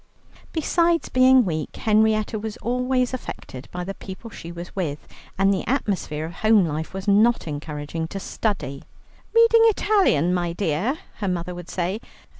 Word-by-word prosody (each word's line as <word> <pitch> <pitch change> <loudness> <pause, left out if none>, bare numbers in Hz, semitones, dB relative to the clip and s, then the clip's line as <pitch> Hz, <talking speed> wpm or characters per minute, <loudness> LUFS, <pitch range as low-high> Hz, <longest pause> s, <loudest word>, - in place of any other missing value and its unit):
Besides 335 +1 +1
being 255 -1 +5
weak, 155 -4 -3
Henrietta 215 0 +2
was 220 0 -5
always 250 +1 0
affected 135 - -7
by 180 0 -4
the 195 +2 -4
people 195 +4 -9
she 170 - -8
was 170 +1 -9
with, 155 -7 -3 0.3
and 195 +1 +4
the 190 - -1
atmosphere 190 - -1
of 165 - -7
home 215 +1 +4
life 155 0 -3
was 190 +1 -6
not 215 +1 +4
encouraging 150 +1 -4
to 195 - -6
study. 190 - -3 0.5
"Reading 460 0 +6
Italian, 390 - +3
my 175 -2 -1
dear?" 190 - 0 0.2
her 205 - -3
mother 180 -1 -2
would 175 -1 -9
say. 185 +4 -2
195 Hz, 155 wpm, -23 LUFS, 170-240 Hz, 0.5 s, Reading